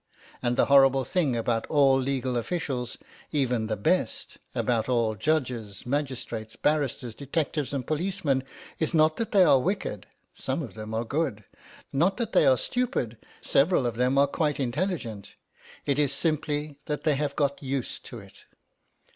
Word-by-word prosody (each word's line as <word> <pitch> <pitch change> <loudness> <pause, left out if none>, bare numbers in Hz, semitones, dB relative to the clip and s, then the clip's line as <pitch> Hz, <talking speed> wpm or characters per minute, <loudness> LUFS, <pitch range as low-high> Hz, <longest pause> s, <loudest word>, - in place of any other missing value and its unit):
And 120 -1 0
the - - +5
horrible 135 -1 +5
thing 145 -2 +1
about 115 0 0
all 140 -3 +5
legal 130 -1 -1
officials, 125 -2 -2 0.3
even 125 -6 0
the 110 -1 -2
best, 100 - -1 0.2
about 115 -1 0
all 115 -3 +2
judges, 115 -5 -2
magistrates, 125 -5 -3
barristers, 140 -5 0
detectives, 145 +2 -2
and 135 -3 -3
policemen, 155 -4 0 0.4
is 160 +1 0
not 155 0 +4
that 230 - -2
they 195 -3 +6
are 145 -6 +6
wicked 170 - -2 0.3
(some - - -3
of - - -8
them 110 0 -6
are 115 +1 -1
good), 135 -6 -1 0.5
not 170 +8 +2
that 235 -2 -3
they 145 - +5
are 130 -1 +6
stupid 230 - -1 0.3
(several 140 -1 +3
of 120 -2 -1
them 125 +3 +2
are 140 - +6
quite 150 +1 -1
intelligent), 130 - -3 0.5
it 140 0 +1
is 145 -2 +2
simply 150 -1 -1
that 150 -1 -2
they 155 - +3
have 140 0 -1
got 140 -1 0
used 135 -2 -3
to 120 - -8
it. 100 -3 -14
135 Hz, 160 wpm, -27 LUFS, 120-150 Hz, 0.5 s, they